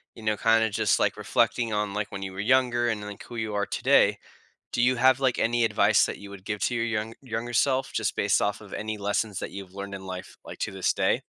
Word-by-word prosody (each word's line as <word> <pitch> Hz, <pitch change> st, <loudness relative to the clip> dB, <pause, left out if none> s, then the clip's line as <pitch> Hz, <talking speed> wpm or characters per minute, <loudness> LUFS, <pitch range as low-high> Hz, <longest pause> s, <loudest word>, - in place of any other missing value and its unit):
you 115 Hz, -, -12 dB
know, 110 Hz, -1 st, +1 dB
kinda 110 Hz, +1 st, +3 dB
just, 105 Hz, -, +1 dB
like, -, -, +2 dB
reflecting 115 Hz, -2 st, +1 dB
on, 105 Hz, -1 st, -1 dB
like, 105 Hz, 0 st, -3 dB
when 95 Hz, -1 st, -5 dB
you 95 Hz, -, -5 dB
were 95 Hz, -, -8 dB
younger 120 Hz, +2 st, +2 dB
and 110 Hz, -2 st, -2 dB
then, 105 Hz, -, -6 dB
like, 100 Hz, -, -10 dB
who 120 Hz, -, -10 dB
you 110 Hz, -2 st, -3 dB
are 100 Hz, 0 st, +1 dB
today, -, -, +3 dB, 0.5 s
do 120 Hz, -, 0 dB
you 125 Hz, +1 st, +4 dB
have, 130 Hz, +2 st, +4 dB
like, 130 Hz, -3 st, +1 dB
any 120 Hz, 0 st, +2 dB
advice 105 Hz, -1 st, +4 dB
that -, -, -5 dB
you 100 Hz, -, -10 dB
would 100 Hz, -1 st, -11 dB
give 105 Hz, -1 st, -3 dB
to 125 Hz, -, 0 dB
your 115 Hz, 0 st, 0 dB
young 110 Hz, -1 st, -2 dB
younger 120 Hz, -2 st, -4 dB
self, 130 Hz, +2 st, +2 dB
just -, -, -1 dB
based -, -, +2 dB
off -, -, -1 dB
of -, -, -13 dB
any 110 Hz, 0 st, -4 dB
lessons 100 Hz, 0 st, -1 dB
that -, -, -5 dB
you've 95 Hz, -2 st, -9 dB
learned 100 Hz, 0 st, -6 dB
in 95 Hz, -1 st, -9 dB
life, 95 Hz, -1 st, -7 dB
like, -, -, -9 dB
to -, -, -2 dB
this -, -, 0 dB
day? -, -, +1 dB
110 Hz, 260 wpm, -26 LUFS, 100-120 Hz, 0.5 s, you